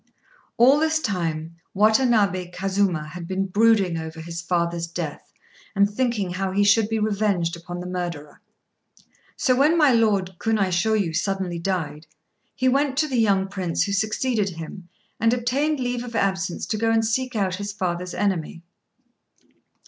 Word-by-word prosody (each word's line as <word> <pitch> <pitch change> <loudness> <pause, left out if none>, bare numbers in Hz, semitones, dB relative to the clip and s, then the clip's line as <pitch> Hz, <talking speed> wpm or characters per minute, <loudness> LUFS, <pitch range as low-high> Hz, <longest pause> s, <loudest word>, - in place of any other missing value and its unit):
All 265 +5 +6
this 315 0 +2
time 165 - -3 0.2
Watanabé 210 -4 +3
Kazuma 185 -4 -1
had 170 +1 -8
been 190 +1 -1
brooding 200 -3 +3
over 160 0 -7
his 170 +1 -6
father's 170 -1 -1
death, 170 -3 -6 0.4
and 200 0 +4
thinking 210 -3 -1
how 190 +1 -2
he 200 +1 +3
should 210 +1 +4
be 225 - 0
revenged 200 -5 0
upon 175 +1 -7
the - - -7
murderer; 175 -5 -5 1.0
so 255 - +2
when 300 +6 +4
my 300 -4 +5
Lord 200 -6 +1
Kunaishôyu 200 -3 +1
suddenly 190 -1 -1
died, 160 -4 -3 0.5
he 260 - 0
went 270 +1 +2
to 305 +1 +2
the 260 -4 0
young 195 -3 +2
Prince 185 -4 -1
who 200 - -3
succeeded 215 +1 0
him 175 +1 -9 0.3
and 230 +2 +3
obtained 270 +5 0
leave 245 -1 -2
of 240 -2 -8
absence 190 -4 -1
to 215 - -2
go 225 +1 +1
and 225 0 +2
seek 255 +3 -1
out 190 -3 0
his 205 +1 -4
father's 180 -2 -3
enemy. 175 -4 -2
195 Hz, 155 wpm, -23 LUFS, 175-225 Hz, 1.0 s, All